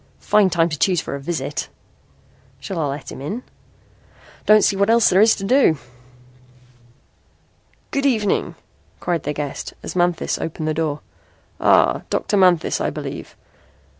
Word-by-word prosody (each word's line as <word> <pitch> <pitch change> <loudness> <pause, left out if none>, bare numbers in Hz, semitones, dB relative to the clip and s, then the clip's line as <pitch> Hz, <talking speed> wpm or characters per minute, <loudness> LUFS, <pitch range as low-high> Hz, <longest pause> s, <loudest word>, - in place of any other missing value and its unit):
"Fine 205 -3 +3
time 170 -1 +1
he 155 - -3
chose 180 +5 +2
for - - -5
a 140 - -4
visit." 160 +4 -4 0.9
"Shall 190 -4 -5
I 150 - 0
let 140 +1 -6
him - - -9
in?" 210 - -5 1.0
"Don't 215 -1 +6
see 200 - +3
what 200 +2 +1
else 230 0 +5
there 185 +2 +5
is 220 +1 +5
to 195 - -8
do." 210 - +3 2.1
"Good 275 0 +1
evening," 215 -6 0 0.4
cried 175 -2 -1
their 150 - -4
guest 145 -2 -5
as - - -6
Manthis 175 -1 0
opened 160 -1 -4
the 155 - 0
door. 155 -2 -2 0.6
"Ah, - - +4
Dr. 205 - -1
Manthis, 180 -4 +3
I - - 0
believe. - - -7
175 Hz, 150 wpm, -21 LUFS, 155-210 Hz, 2.1 s, Don't